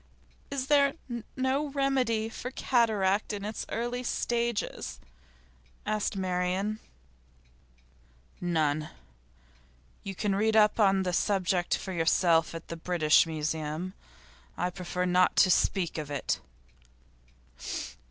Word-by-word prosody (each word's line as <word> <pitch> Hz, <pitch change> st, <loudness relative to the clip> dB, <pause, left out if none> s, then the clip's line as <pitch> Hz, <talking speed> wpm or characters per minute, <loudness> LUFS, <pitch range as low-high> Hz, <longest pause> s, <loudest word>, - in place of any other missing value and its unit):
'Is 275 Hz, -2 st, -2 dB
there 280 Hz, -1 st, +4 dB, 0.4 s
no 265 Hz, +3 st, 0 dB
remedy 265 Hz, -6 st, +1 dB
for 235 Hz, +2 st, -6 dB
cataract 220 Hz, -7 st, +1 dB
in 200 Hz, -1 st, -4 dB
its 215 Hz, +1 st, -4 dB
early 240 Hz, +2 st, -2 dB
stages?' 235 Hz, -2 st, -2 dB, 0.9 s
asked 215 Hz, 0 st, -1 dB
Marian. 185 Hz, +3 st, -1 dB, 1.6 s
'None. 155 Hz, -3 st, 0 dB, 1.1 s
You 195 Hz, -1 st, -6 dB
can 205 Hz, +1 st, 0 dB
read 215 Hz, +3 st, +2 dB
up 210 Hz, -1 st, +5 dB
the 195 Hz, -4 st, +3 dB
subject 185 Hz, -2 st, +1 dB
for 190 Hz, -, -6 dB
yourself 165 Hz, -1 st, +3 dB
at 165 Hz, -, -8 dB
the 170 Hz, -, -4 dB
British 165 Hz, -2 st, +3 dB
Museum. 155 Hz, +2 st, -3 dB, 0.6 s
I 180 Hz, 0 st, -1 dB
prefer 180 Hz, 0 st, -3 dB
not 180 Hz, 0 st, +3 dB
to 185 Hz, -, +5 dB
speak 175 Hz, -3 st, +1 dB
of 150 Hz, -1 st, -5 dB
it. 145 Hz, -2 st, -1 dB
195 Hz, 105 wpm, -29 LUFS, 175-225 Hz, 1.6 s, up